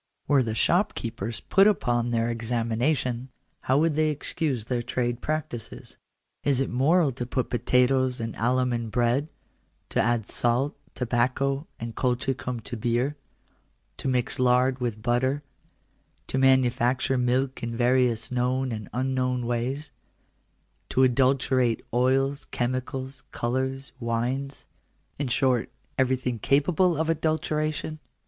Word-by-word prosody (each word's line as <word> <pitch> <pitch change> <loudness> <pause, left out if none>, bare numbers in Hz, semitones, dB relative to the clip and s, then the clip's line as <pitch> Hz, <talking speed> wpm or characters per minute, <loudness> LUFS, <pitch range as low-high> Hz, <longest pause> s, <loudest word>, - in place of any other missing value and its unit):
Were 145 -2 +4
the 110 -3 -2
shopkeepers 115 - 0
put 195 +1 +4
upon 120 - +1
their 115 0 +1
examination, 120 +2 -1 0.3
how 130 - +1
would 160 +1 +3
they 155 +1 +2
excuse 145 -4 -2
their 120 0 -1
trade 120 0 -2
practices? 150 -7 -4 0.4
Is 140 -3 +2
it 135 - -1
moral 145 +5 +3
to 125 -1 -5
put 130 -1 -2
potatoes 125 +1 +2
and 115 -1 -4
alum 125 +2 +1
in 115 -1 -2
bread; 120 +5 +1 0.6
to - - +1
add 120 -3 +1
salt, 120 +4 0 0.2
tobacco, 130 +4 0
and 115 0 -6
colchi 130 +1 0
cum 125 -1 -5
to 120 +3 -6
beer; 120 +5 0 0.8
to - - -4
mix 125 -2 0
lard 125 +1 +3
with 115 -4 -3
butter; 130 +5 +1 0.9
to 130 - 0
manufacture 130 0 +3
milk 130 +2 0
in 115 0 -4
various 125 -1 +2
known 125 +1 0
and 110 -2 -5
unknown 125 0 0
ways; 130 +5 -2 1.0
to 130 - +3
adulterate 130 -1 +2
oils, 135 +3 +2
chemicals, 130 +2 -3
colours, 130 +3 -2
wines 125 +4 -2 0.3
— - - -41
in 145 - -1
short, 125 -1 +1 0.3
everything 130 -2 +1
capable 160 - +2
of 160 +1 0
adulteration 155 -1 -1
125 Hz, 125 wpm, -26 LUFS, 120-135 Hz, 1.0 s, Were